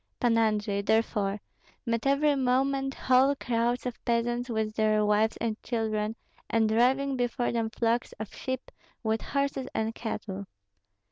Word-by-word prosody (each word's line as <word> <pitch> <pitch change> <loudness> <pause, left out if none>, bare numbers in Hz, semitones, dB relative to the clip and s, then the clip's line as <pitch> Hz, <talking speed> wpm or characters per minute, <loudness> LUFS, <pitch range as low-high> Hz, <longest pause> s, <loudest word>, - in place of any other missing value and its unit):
Pan 240 -2 +3
Andrei, 210 -3 +1
therefore, 210 -1 +1 0.5
met 230 +2 0
every 290 +2 +3
moment 270 +1 +1
whole 260 +2 +4
crowds 240 -1 0
of 245 -2 -5
peasants 240 +1 0
with 220 -2 -1
their 215 -1 +2
wives 210 +1 +2
and 225 -1 -3
children, 220 -2 -1 0.3
and 225 -1 +3
driving 260 +5 +2
before 245 0 0
them 230 -1 0
flocks 235 +1 0
of 215 -1 -8
sheep 260 -1 -5 0.3
with 220 0 0
horses 280 -2 -1
and 220 +1 0
cattle. 200 -4 -5
230 Hz, 140 wpm, -28 LUFS, 220-255 Hz, 0.5 s, whole